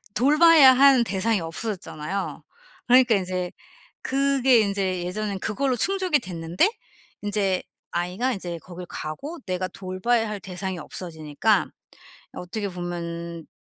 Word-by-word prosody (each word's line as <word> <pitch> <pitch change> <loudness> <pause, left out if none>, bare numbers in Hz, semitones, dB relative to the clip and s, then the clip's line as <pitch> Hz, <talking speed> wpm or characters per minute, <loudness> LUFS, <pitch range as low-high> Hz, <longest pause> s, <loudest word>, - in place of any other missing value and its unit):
돌봐야 295 +1 +7
하는 270 -2 +6
대상이 205 +2 0
없어졌잖아요. 185 0 -4 0.4
그러니까 250 -2 +6
이제 185 -2 -2 0.5
그게 270 -2 +3
인제 195 -3 -1
예전엔 200 +1 -3
그걸로 255 +6 -1
충족이 370 - +1
됐는데 175 - 0 0.5
인제 200 -3 0 0.3
아이가 185 +9 -1
이제 175 -5 -5
거길 180 0 -9
가고 280 - -6
내가 185 0 -2
돌봐야 195 +5 -1
할 210 - -4
대상이 190 0 -5
없어지니까 160 +4 -1 0.7
어떻게 200 +3 -4
보면 170 -2 -6
195 Hz, 290 characters per minute, -24 LUFS, 180-245 Hz, 0.7 s, 돌봐야